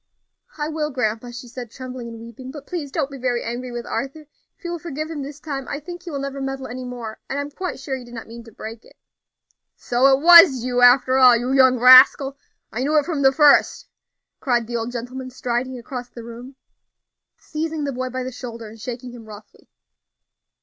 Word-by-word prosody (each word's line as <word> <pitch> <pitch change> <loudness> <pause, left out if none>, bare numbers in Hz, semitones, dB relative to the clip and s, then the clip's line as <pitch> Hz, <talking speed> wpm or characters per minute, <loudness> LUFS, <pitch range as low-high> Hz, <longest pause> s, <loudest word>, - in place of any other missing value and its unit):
"I 295 -1 -2
will, 305 -1 -2
grandpa," 245 -3 -2
she 245 +1 -9
said, 240 0 -8
trembling 255 0 -8
and 230 -1 -9
weeping; 235 +3 -10
"but 285 +1 -9
please 320 -6 -5
don't 290 -2 -2
be 275 - -8
very 245 -1 -1
angry 245 +2 -5
with 240 0 -6
Arthur; 275 +3 -4 0.4
if - - -33
you 345 - -4
will 345 - -4
forgive 310 -1 -5
him 300 -3 -5
this 285 +1 -8
time, 275 -4 -5
I 285 - -4
think 350 +3 -9
he 360 - -9
will 290 - -4
never 275 0 -5
meddle 270 0 -4
any 255 +1 -7
more; 240 -3 -7
and 275 - -3
I - - 0
am 290 - -9
quite 365 0 -5
sure 270 0 -4
he 260 - -8
did 240 0 -12
not 230 - -7
mean 235 +1 -11
to 230 - -14
break 220 +2 -9
it." - - -20 0.8
"So 245 +2 +2
it 270 0 +4
was 335 -7 +8
you, 245 0 0
after 255 +1 +5
all, 250 -2 +7
you 245 +2 -3
young 260 -2 +5
rascal! 255 +2 +7 0.4
I 220 - -5
knew 300 +4 +1
it 295 - +3
from 320 -5 -2
the 270 -1 +5
first!" 290 +1 +4 0.5
cried 240 -3 0
the 240 +1 -6
old 230 +1 -3
gentleman, 250 +2 -6
striding 255 0 -3
across 245 0 -7
the 235 - -10
room, 240 +3 -10 0.8
seizing 315 0 -4
the 280 - -2
boy 255 +1 -3
by 255 +1 -4
the 255 - -5
shoulder 235 -2 -8
and 220 0 -14
shaking 250 +1 -6
him 235 -2 -12
roughly. 210 -1 -14
255 Hz, 220 wpm, -22 LUFS, 240-280 Hz, 0.8 s, was